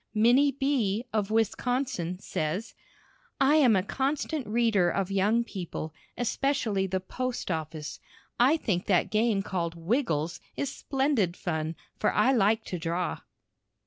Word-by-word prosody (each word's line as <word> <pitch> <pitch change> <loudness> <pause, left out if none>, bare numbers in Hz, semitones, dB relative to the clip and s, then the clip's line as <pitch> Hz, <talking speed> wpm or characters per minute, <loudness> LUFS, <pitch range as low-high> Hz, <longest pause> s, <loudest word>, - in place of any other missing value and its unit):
Minnie 250 +6 +5
B., 250 -6 0
of 210 -2 0
Wisconsin, 225 -4 0
says: 180 +3 -3 0.7
I 275 +3 +5
am 255 -8 +5
a 185 - +2
constant 280 - -2
reader 215 -5 +3
of 195 +2 -1
Young 205 +4 +2
People, 175 -7 -6 0.2
especially 235 -5 0
the 190 0 -1
"Post 245 +3 -4
Office." 155 -2 -4 0.4
I 265 +7 +5
think 190 - -1
that 185 -4 +2
game 215 -2 +2
called 170 -4 -2
"Wiggles" 170 - -1 0.2
is 280 - -2
splendid 265 - 0
fun, 160 -2 -2 0.2
for - - +2
I 210 +6 +3
like 220 -2 +3
to 180 - -4
draw. 170 +2 -2
210 Hz, 135 wpm, -28 LUFS, 180-255 Hz, 0.7 s, Minnie